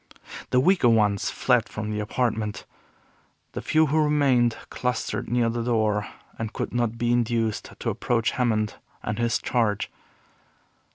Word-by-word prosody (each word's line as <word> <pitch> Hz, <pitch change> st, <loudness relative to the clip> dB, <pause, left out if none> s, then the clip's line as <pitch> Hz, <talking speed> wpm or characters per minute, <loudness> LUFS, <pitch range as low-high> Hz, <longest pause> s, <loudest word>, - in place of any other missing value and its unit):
The 125 Hz, -, +3 dB
weaker 175 Hz, -3 st, +4 dB
ones 105 Hz, -3 st, +2 dB
fled 125 Hz, -3 st, +1 dB
from 110 Hz, 0 st, -4 dB
the 105 Hz, -, -2 dB
apartment. 105 Hz, -1 st, -2 dB, 0.9 s
The -, -, -5 dB
few 160 Hz, 0 st, +3 dB
who 155 Hz, +2 st, +1 dB
remained 135 Hz, -6 st, +3 dB
clustered 125 Hz, 0 st, -2 dB
near 120 Hz, -1 st, +2 dB
the 115 Hz, +1 st, -1 dB
door 110 Hz, -3 st, +1 dB, 0.3 s
and 110 Hz, -1 st, -3 dB
could -, -, -4 dB
not 120 Hz, -1 st, 0 dB
be 120 Hz, +1 st, 0 dB
induced 115 Hz, -2 st, 0 dB
to -, -, -2 dB
approach 115 Hz, -2 st, 0 dB
Hammond 110 Hz, -5 st, 0 dB, 0.3 s
and 105 Hz, +2 st, -3 dB
his 120 Hz, 0 st, +2 dB
Charge. 115 Hz, -5 st, 0 dB
115 Hz, 145 wpm, -25 LUFS, 110-125 Hz, 0.9 s, weaker